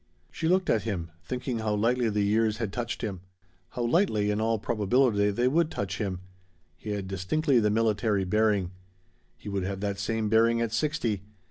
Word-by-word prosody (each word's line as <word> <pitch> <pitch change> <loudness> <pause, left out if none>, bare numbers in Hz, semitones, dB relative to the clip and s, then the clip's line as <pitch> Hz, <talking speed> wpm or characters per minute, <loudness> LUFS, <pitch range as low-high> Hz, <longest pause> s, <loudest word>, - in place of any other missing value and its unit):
She 160 - -2
looked 185 +1 +2
at 110 - +2
him, 90 -7 -4
thinking 125 +5 -3
how 110 -1 0
lightly 120 +3 +1
the 105 -1 0
years 110 +1 +2
had 110 -4 -3
touched 120 +1 -4
him 100 -5 -4 0.5
how 120 - -4
lightly, 120 - +2
in 105 +1 -1
all 115 0 +1
probability, 105 0 +2
they 120 +5 +1
would 160 +4 +2
touch 100 - -4
him. 95 -4 -3 0.5
He - - -9
had 100 -2 -3
distinctly 120 - +1
the 105 -1 +2
military 110 -2 +1
bearing. 100 -1 +1 0.7
He - - -13
would 100 -1 -1
have 95 +1 -3
that 100 -1 -2
same 110 +2 -1
bearing 115 +2 +3
at 115 -2 -1
sixty. 115 -7 0
110 Hz, 185 wpm, -28 LUFS, 100-120 Hz, 0.7 s, bearing